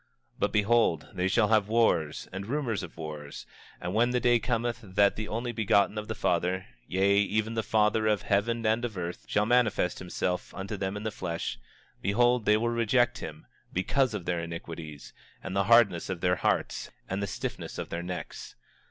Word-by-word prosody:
25:12 - - -30
But, - - +1
behold, 105 -6 +2
they 90 -1 0
shall 105 +2 +3
have 110 -3 +3
wars, 105 -9 +1
and 95 +1 -5
rumors 125 -6 -1
of 85 -2 -9
wars; 75 -2 -7 0.3
and 90 - -4
when 120 +3 +3
the 125 0 +1
day 120 -1 +4
cometh 120 +1 -1
that 100 -1 +2
the 110 0 -4
Only 120 +2 -2
Begotten 105 -2 +2
of 105 - -7
the 110 - -3
Father, 90 +2 0 0.2
yea, 100 +2 +3
even 110 +2 0
the 115 - 0
Father 110 0 +2
of 105 -2 +1
heaven 115 +3 +1
and 110 +2 +2
of 115 -5 -3
earth, 85 0 -5
shall 105 - +2
manifest 110 -6 +2
himself 90 0 -3
unto 100 +2 -4
them 95 0 -3
in 105 - -6
the 110 - -2
flesh, 85 -9 -4 0.4
behold, 120 +3 +2
they 105 0 +5
will 120 +2 0
reject 120 +1 +2
him, 75 -1 -8 0.3
because 115 +6 +1
of 95 -5 -5
their 85 -1 0
iniquities, 85 -3 -7 0.3
and 95 0 -5
the 100 0 +2
hardness 110 -7 +4
of 90 -3 -4
their 90 -1 +2
hearts, - - 0 0.2
and 95 +2 -2
the 100 - -1
stiffness - - -5
of - - -5
their 85 - -3
necks. 90 0 -6
105 Hz, 195 wpm, -29 LUFS, 90-115 Hz, 0.4 s, they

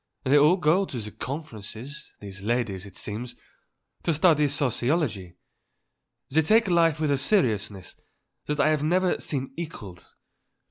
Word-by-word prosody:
They 135 +1 +3
all 150 +5 +6
go 175 +3 +3
to 110 - -6
conférences, 130 +2 -7
these 100 -1 -10
ladies, 105 -3 -2
it 95 - -13
seems, 120 +4 -6 0.7
and 165 - +1
study 155 -3 +4
sociology. 125 - -1 0.9
They 160 +4 +4
take 220 +7 +4
life 165 -3 +3
with 155 -2 +1
a 140 - +1
seriousness 110 - 0 0.5
that 150 0 -2
I 155 - +4
have 155 -2 +1
never 180 +4 +1
seen 135 -2 -4
equalled. 110 - -8
140 Hz, 135 wpm, -26 LUFS, 110-160 Hz, 0.9 s, all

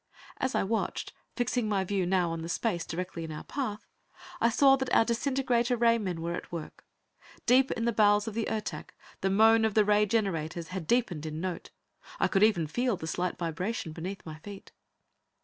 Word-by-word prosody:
As 260 - -1
I - - +2
watched, 220 +3 -2 0.2
fixing 245 -2 0
my 195 -2 +1
view 190 -1 -1
now 180 -2 +2
on 165 0 -4
the 165 - -6
space 175 -2 -1
directly 180 0 -4
in 160 - -6
our 150 - -6
path, 225 -7 -4 0.5
I 230 - +4
saw 270 +3 +5
that 265 -1 -3
our 225 - +5
disintegrator 245 0 +1
ray 230 0 +4
men 180 -6 -3
were 170 +1 -2
at - - -6
work. 170 -3 -7 0.6
Deep 260 +2 +5
in 230 - -2
the 235 - +1
bowels 205 0 +4
of 225 - -3
the 225 0 -2
Ertak, 215 -1 -4 0.3
the 195 - +1
moan 220 +3 +5
of 220 -2 +1
the 215 -1 +5
ray 210 0 +3
generators 170 -6 -1
had 185 -3 -5
deepened 180 -10 0
in 155 0 -5
note; 180 0 -4 0.5
I - - +3
could 195 - +1
even 210 -7 +4
feel 240 +6 0
the 160 - -6
slight 180 +2 -2
vibration 175 +2 -3
beneath 180 +5 -6
my 155 -1 -8
feet. 200 +4 -11
205 Hz, 200 wpm, -29 LUFS, 175-230 Hz, 0.6 s, saw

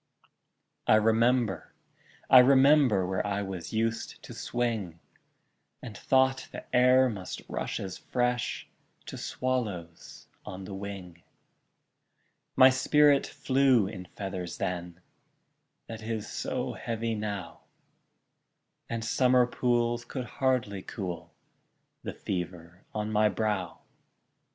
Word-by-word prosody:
I - - +6
remember, 115 -3 +2 0.5
I 130 - +9
remember, 135 -5 +5
Where 95 0 -1
I 100 0 -1
was 90 -4 -6
used 115 +1 -2
to - - -9
swing, 110 -9 -3 0.8
And 115 -5 -8
thought 130 +3 +2
the - - -8
air 125 +1 +6
must 100 -6 -6
rush - - -3
as 95 -2 -6
fresh 125 -1 -1 0.4
To - - -7
swallows 105 -10 -4 0.2
on 95 +1 -8
the 100 - -8
wing; 95 -3 -8 1.3
My 130 0 +8
spirit 145 +2 +4
flew 130 -5 +2
in 95 -2 -7
feathers 90 -3 -6
then, 90 -1 -4 0.8
That 115 -1 -8
is 110 -1 -4
so - - -3
heavy 115 0 -3
now, 105 -3 -5 1.3
And 115 -1 -3
summer 125 +1 +4
pools 120 -1 0
could 125 +1 -5
hardly 120 -6 -1
cool 90 -6 -6 0.7
The - - -6
fever 90 -1 -6
on 105 0 -3
my 105 0 +3
brow! 105 -1 -2
110 Hz, 110 wpm, -28 LUFS, 95-125 Hz, 1.3 s, I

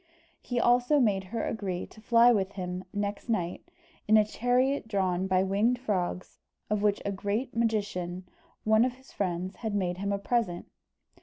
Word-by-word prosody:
He 245 -1 -2
also 245 +5 +4
made 200 -6 +2
her 225 +5 -3
agree 190 -5 -3
to 215 - -16
fly 235 +1 +6
with 200 -3 0
him 180 -1 -5
next 205 +2 -3
night, 180 - -2 0.4
in 215 +1 +6
a 215 - +5
chariot 245 +4 +1
drawn 190 -3 0
by 185 0 +3
winged 205 +6 +2
frogs, 185 -7 -3 0.3
of 210 -1 +1
which 205 -1 +1
a 200 - 0
great 205 +6 -2
magician, 200 -6 -1 0.4
one 220 +1 +4
of 250 0 0
his 260 +1 -19
friends, 185 -1 -3
had 220 -3 -3
made 180 -2 -1
him 200 +1 -1
a 200 - +1
present. 200 -4 -1
205 Hz, 170 wpm, -29 LUFS, 185-235 Hz, 0.4 s, fly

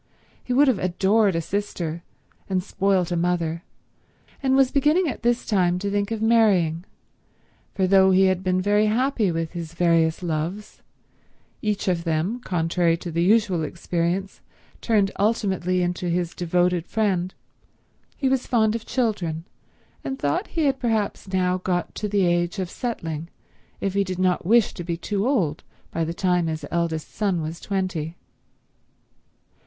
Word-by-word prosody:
He - - -6
would 280 +4 +5
have 255 -7 +2
adored 190 +2 +2
a 165 - 0
sister 170 -3 -3 0.5
and 185 -1 0
spoilt 195 -3 0
a - - +1
mother, 170 -1 -1 0.8
and 265 -1 +2
was 270 -1 +4
beginning 305 +6 +3
at 280 - -4
this 240 +1 +1
time 180 -4 +2
to 200 +2 -3
think 200 0 0
of 225 -1 -3
marrying; 190 -8 +3 0.9
for 190 - +2
though 190 0 +5
he 190 0 +5
had 185 -1 +1
been 185 0 +1
very 205 +2 +3
happy 230 -3 +1
with 165 -1 -2
his 170 -1 -7
various 165 -1 +2
loves, 170 +5 -4 0.8
each 210 -2 -1
of 175 -2 +1
whom, 165 +8 -1
contrary 170 -4 +1
to 170 0 -6
the 165 +1 0
usual 195 -2 +3
experience, 170 +4 -2 0.4
turned 205 -4 +2
ultimately 190 -4 +1
into 175 0 -2
his 170 0 -1
devoted 175 0 0
friend, 190 -4 0 0.8
he 270 - 0
was 265 -1 0
fond 220 -4 +2
of 230 -1 -5
children 180 -10 -1 0.6
and 270 - -4
thought 355 +8 -1
he 320 - +3
had 270 -1 +1
perhaps 220 -5 -1
now 185 -1 0
got 180 -1 -2
to 210 - -4
the 200 -2 +2
age 175 +2 +1
of 185 -2 -3
settling 165 - -4 0.5
if 195 - -2
he 200 0 +2
did 185 -2 -4
not 185 -2 +1
wish 230 0 +4
to 175 - -6
be 170 -1 -3
too 205 +5 -2
old 180 - 0 0.3
by 165 - -1
the 160 - -2
time 180 -1 +1
his 155 -2 -3
eldest 170 -2 -2
son 195 -5 0
was 160 +1 -5
twenty. 185 -5 -3
185 Hz, 160 wpm, -24 LUFS, 170-210 Hz, 0.9 s, would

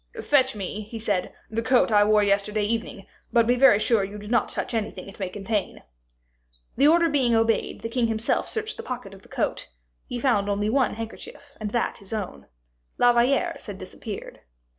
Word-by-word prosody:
"Fetch 265 -4 +3
me," 205 +1 -4
he 215 +2 -8
said, 205 -4 -1 0.2
"the 225 +1 -1
coat 250 0 +3
I 205 -1 +6
wore 210 0 +4
yesterday 205 +1 +1
evening, 210 -2 -3 0.3
but 235 -2 +4
be 240 - +3
very 250 -4 +6
sure 215 -1 +2
you 200 +2 -6
do 210 0 -9
not 235 -1 +1
touch - - -4
anything 210 -4 -3
it 195 - -12
may 190 -2 -2
contain." 205 +1 -3 0.9
The 275 +3 +5
order 335 +2 +5
being 265 -6 +2
obeyed, 225 0 +1
the - - -3
king 230 0 0
himself 225 0 0
searched 440 -1 -3
the - - -5
pocket 250 - -6
of 195 - -13
the - - -20
coat; - - -2 0.4
he 245 - -4
found 230 -5 +1
only 205 +1 0
one 265 -3 +2
handkerchief, 230 +5 -9
and 210 - -2
that 235 +3 -1
his 200 +2 -9
own; 185 - -5 0.5
La 245 0 +5
Valliere's 275 +8 +1
had 205 -2 -6
disappeared. 195 +2 -8
225 Hz, 195 wpm, -25 LUFS, 205-245 Hz, 0.9 s, I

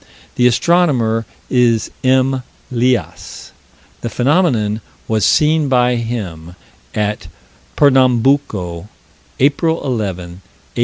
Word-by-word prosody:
The 125 - +3
astronomer 120 -5 +1 0.2
is 120 -3 +1
M. 130 0 +2 0.3
Lias: 125 0 -2 0.5
the 120 - -3
phenomenon 120 - +1 0.3
was 110 -4 +1
seen 155 -1 +2
by 125 -1 +2
him, 95 -8 -5 0.4
at 105 0 -2 0.5
Pernambuco, 125 - +2 0.5
April 160 +4 +1
11, 105 -8 -2 0.2
1860. 95 +5 -14
125 Hz, 90 wpm, -16 LUFS, 110-135 Hz, 0.5 s, The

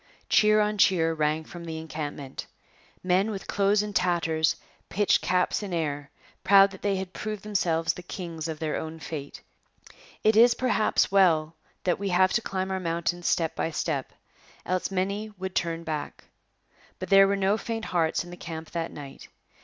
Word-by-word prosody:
Cheer 215 0 +5
on 210 0 -1
cheer 165 -4 +4
rang 155 0 0
from 170 +2 -10
the 160 -1 -5
encampment. 150 -4 -6 0.6
Men 185 +3 +2
with 200 -3 -5
clothes 205 +1 +2
in 210 -1 -5
tatters 165 -4 +1 0.3
pitched 205 0 +2
caps 180 +3 +1
in 200 -3 -5
air, 145 -3 -3 0.3
proud 195 0 +6
that 190 - -12
they 200 -1 +1
had 190 -1 -5
proved 215 -2 -5
themselves 165 -6 0
kings 165 -4 -5
of 160 -1 -4
their 155 -1 -2
own 160 +1 -6
fate. 150 -3 -7 0.8
It 215 0 +4
is, 235 +1 +6
perhaps, 245 -5 +1
well 165 -5 +3 0.3
that 180 0 +1
we 200 -1 -2
have 185 +1 +3
to 235 - +2
climb 190 -2 -3
our 190 - -1
mountains 170 0 -2
step 165 -3 +1
by - - -1
step; 155 -4 -2 0.5
else 185 0 -1
would 195 - -7
many 200 +3 -1 0.2
turn 165 -2 -1
back. 155 -3 -5 0.7
But - - -6
there 195 0 +8
were 200 - +1
no 195 +1 +2
faint 225 0 -4
hearts 165 -2 0
in 175 - -11
the 175 - -9
camp 160 -1 -7
that 165 -1 -3
night. 140 -2 -10
180 Hz, 175 wpm, -27 LUFS, 160-195 Hz, 0.8 s, there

